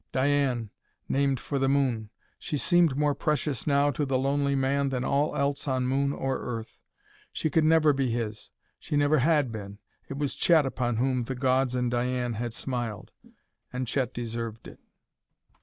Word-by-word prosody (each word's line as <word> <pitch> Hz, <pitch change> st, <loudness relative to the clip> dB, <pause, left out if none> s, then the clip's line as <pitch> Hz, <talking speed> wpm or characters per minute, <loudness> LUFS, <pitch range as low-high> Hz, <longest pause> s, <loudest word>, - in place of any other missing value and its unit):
Diane 130 Hz, -5 st, +1 dB, 0.4 s
named 135 Hz, -2 st, +1 dB
for 140 Hz, +3 st, -3 dB
the 135 Hz, 0 st, +2 dB
moon: 130 Hz, -6 st, +1 dB, 0.3 s
she 150 Hz, -, -3 dB
seemed 170 Hz, -3 st, +3 dB
more 145 Hz, 0 st, +2 dB
precious 150 Hz, -4 st, -1 dB
now 145 Hz, 0 st, +3 dB
to 145 Hz, +2 st, -2 dB
the 135 Hz, -2 st, +1 dB
lonely 140 Hz, +1 st, +1 dB
man 135 Hz, +1 st, +1 dB
than 125 Hz, -2 st, -2 dB
all 145 Hz, +2 st, +1 dB
else 140 Hz, +1 st, -1 dB
on 130 Hz, -2 st, 0 dB
moon 140 Hz, +2 st, +1 dB
or 135 Hz, -2 st, -2 dB
Earth. 115 Hz, -2 st, -6 dB, 0.5 s
She 155 Hz, -, -2 dB
could 160 Hz, +3 st, +3 dB
never 155 Hz, -1 st, +5 dB
be 135 Hz, -2 st, 0 dB
his; 115 Hz, -2 st, -3 dB, 0.3 s
she 145 Hz, -, -2 dB
never 145 Hz, +1 st, +3 dB
had 145 Hz, -2 st, +2 dB
been. 100 Hz, -2 st, -7 dB, 0.3 s
It 135 Hz, -, -5 dB
was 145 Hz, -1 st, -1 dB
Chet 160 Hz, -4 st, +4 dB
upon 125 Hz, -3 st, -1 dB
whom 125 Hz, 0 st, 0 dB
the 130 Hz, -, -4 dB
gods 130 Hz, 0 st, +1 dB
and 125 Hz, -1 st, 0 dB
Diane 125 Hz, 0 st, -1 dB
had 115 Hz, +1 st, -4 dB
smiled. 120 Hz, -5 st, -4 dB, 0.6 s
And 125 Hz, +1 st, -3 dB
Chet 125 Hz, 0 st, -1 dB
deserved 115 Hz, -1 st, -5 dB
it. -, -, -13 dB
135 Hz, 175 wpm, -27 LUFS, 120-140 Hz, 0.6 s, never